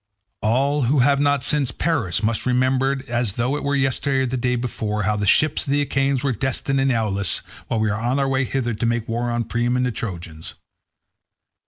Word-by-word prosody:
"All 135 +5 +1
who 140 +5 +2
have 140 -1 +3
not 145 -2 +2
since 145 -4 +2
perished 120 - -1
must 110 +3 0
remember 130 +2 +1
as 120 -4 0
though 125 +6 0
it 145 - -4
were 140 0 0
yesterday 135 0 +1
or - - +1
the 130 +1 -2
day 125 0 0
before, 110 -3 -2
how 105 +2 +1
the 105 -1 -1
ships 155 +7 +3
of - - -4
the 145 0 +2
Achaeans 135 -1 0
were 140 - +1
detained 135 +3 -1
in 135 0 +2
Aulis 100 -5 -1 0.2
when 110 - -1
we 110 - +2
were - - 0
on 120 +5 -1
our 135 -1 +1
way 135 0 +1
hither 120 -2 -1
to 110 - -2
make 115 -1 -1
war 120 +1 -1
on 120 0 0
Priam 120 +2 0
and 125 - +1
the 125 - 0
Trojans. 85 -8 -6
125 Hz, 215 wpm, -22 LUFS, 115-135 Hz, 0.2 s, have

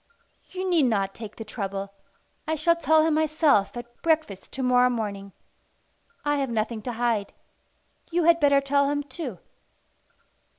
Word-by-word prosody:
"You 375 0 -4
need 340 -6 +3
not 195 -4 0
take 220 -2 -9
the 225 - -8
trouble. 200 -2 -5 0.5
I 315 - 0
shall 335 +3 +3
tell 315 -2 +3
him 320 - +2
myself 305 -8 +2
at 240 0 -10
breakfast 315 - -1
to 265 - -3
morrow 250 0 +4
morning. 205 -4 -4 0.9
I 290 0 +1
have 275 -2 -1
nothing 225 0 -2
to 245 +2 -4
hide. 230 -3 -1 0.8
You 345 0 +1
had 335 +1 +5
better 280 -2 +4
tell 280 0 +2
him 290 0 -1
too." 265 - -6
260 Hz, 155 wpm, -25 LUFS, 220-310 Hz, 0.9 s, had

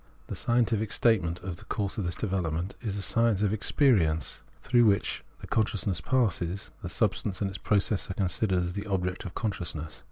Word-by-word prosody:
The - - -5
scientific 115 -3 +1
statement 90 -7 +2
of 90 -3 -5
the - - -13
course 100 0 -2
of 100 - -1
this 85 - -1
development 90 -3 -2
is 105 -4 -2
a 100 - -3
science 115 0 +2
of 100 - +2
the - - +1
experience 100 - +2 0.2
through 120 -2 +4
which 100 -2 +2 0.3
consciousness 100 -5 +1
passes; 95 -7 0
the - - -5
substance 95 -3 0
and 100 - 0
its 95 - -6
process 100 0 +1
are 95 - -3
considered 95 +1 +1
as 90 0 -3
the 100 +2 -5
object 90 -1 -1
of 90 - -7
consciousness. 85 -8 -3
100 Hz, 185 wpm, -28 LUFS, 90-110 Hz, 0.3 s, through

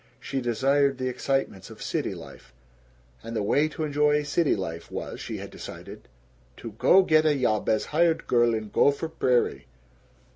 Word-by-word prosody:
She 135 -1 -4
desired 135 +3 +1
the 130 -1 -2
excitements 135 -6 -2
of - - -12
city - - -3
life, 60 - -13 0.7
and 115 +1 -7
the 105 - -1
way 145 +9 +2
to 155 0 -5
enjoy 150 0 +2
city 145 +2 +1
life 85 -4 -6
was, - - -6
she - - -5
had - - -8
decided, - - -10 0.5
to 115 - -8
"go 180 - +4
get 155 -3 +4
a 155 -2 +3
yob 110 -6 0
as 110 - +1
hired 165 +1 +2
girl 120 -1 +3
in 110 -1 -5
Gopher 145 +7 +2
Prairie." 125 - 0
135 Hz, 170 wpm, -26 LUFS, 115-150 Hz, 0.7 s, go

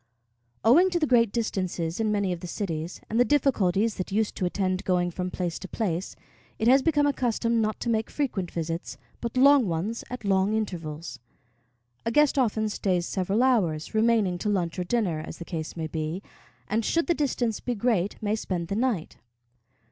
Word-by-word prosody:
Owing 330 +12 +6
to 350 -2 0
the 310 - +2
great 235 -6 +4
distances 185 -7 -2
in 220 -1 +1
many 200 -3 +1
of 175 - -6
the 180 - -7
cities, 170 -2 -4
and 225 - -1
the - - +7
difficulties 230 -7 +2
that 185 - -4
used 215 +1 0
to 185 - 0
attend 185 0 -1
going 175 -1 +1
from 180 +1 -3
place 180 -2 -3
to 190 - -7
place, 185 -4 -2 0.4
it 220 - 0
has 265 +3 +6
become 295 -1 +2
a 285 - +2
custom 235 -2 0
not 215 0 -1
to - - -3
make 220 -1 0
frequent 215 - -2
visits, 165 0 -4 0.2
but 235 +1 -4
long 275 -2 +6
ones 185 +7 -2
at 250 -3 -6
long 195 +2 +2
intervals. 165 -7 -4 0.8
A - - 0
guest 295 +2 +4
often 220 -3 +1
stays 185 -4 0
several 195 +6 0
hours, 185 -12 +1
remaining 220 -5 +2
to 210 - -1
lunch 180 -3 -1
or - - 0
dinner, 180 -5 0
as 155 - -7
the 170 - -8
case 160 -1 -5
may 160 - -2
be, 160 +4 -4 0.4
and, 220 +2 0
should 335 +9 +1
the 345 - +2
distance 250 -7 -1
be 245 - -3
great, 210 -4 +1
may 210 +1 +1
spend 175 -6 -3
the 200 - -1
night. 225 -8 -1
205 Hz, 195 wpm, -26 LUFS, 175-235 Hz, 0.8 s, the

